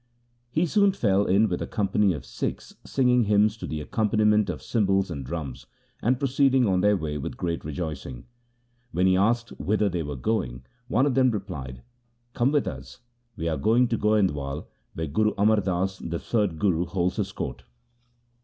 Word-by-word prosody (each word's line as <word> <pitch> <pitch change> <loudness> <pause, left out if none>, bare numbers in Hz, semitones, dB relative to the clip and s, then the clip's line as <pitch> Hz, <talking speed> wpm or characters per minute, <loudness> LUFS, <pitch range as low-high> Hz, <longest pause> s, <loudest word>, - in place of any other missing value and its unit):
He 160 +8 +1
soon 200 +3 +3
fell 100 - +2
in 100 +4 +4
with 90 -3 -2
a - - -3
company 105 -1 +1
of 70 -4 -7
Sikhs - - -5
singing 125 -3 +2
hymns 105 +1 +3
to - - -6
the 75 -1 -4
accompaniment 105 +3 +2
of - - -5
cymbals 95 -5 +1
and 70 -4 -5
drums, 70 -2 -6 0.3
and 125 +3 +2
proceeding 135 -1 +3
on 95 -3 +2
their 105 0 +4
way 75 -3 -3
with 70 - -5
great 85 -1 -2
rejoicing. 75 -5 -5 0.7
When 90 +2 +1
he 95 0 +4
asked 115 +4 +2
whither 105 0 +1
they 90 -2 -2
were 75 -2 -4
going, 65 - -2 0.2
one 130 +1 +2
of 145 - +1
them 130 0 +4
replied, 90 - -5 0.2
' 120 0 -44
Come 125 +3 +2
with 145 -2 +2
us, 65 - -8 0.3
we 85 -5 -3
are 80 -2 0
going 115 - +3
to 115 - 0
Goind 105 -3 +3
wal 70 +1 -5 0.3
where 80 - -2
Guru 105 +9 +1
Amar 105 +2 +4
Das, 95 0 -1
the 85 0 -4
third 105 -4 -1
Guru, 90 -2 +1
holds 90 +1 -1
his 100 -2 -2
court. - - -5
100 Hz, 185 wpm, -26 LUFS, 80-115 Hz, 0.7 s, in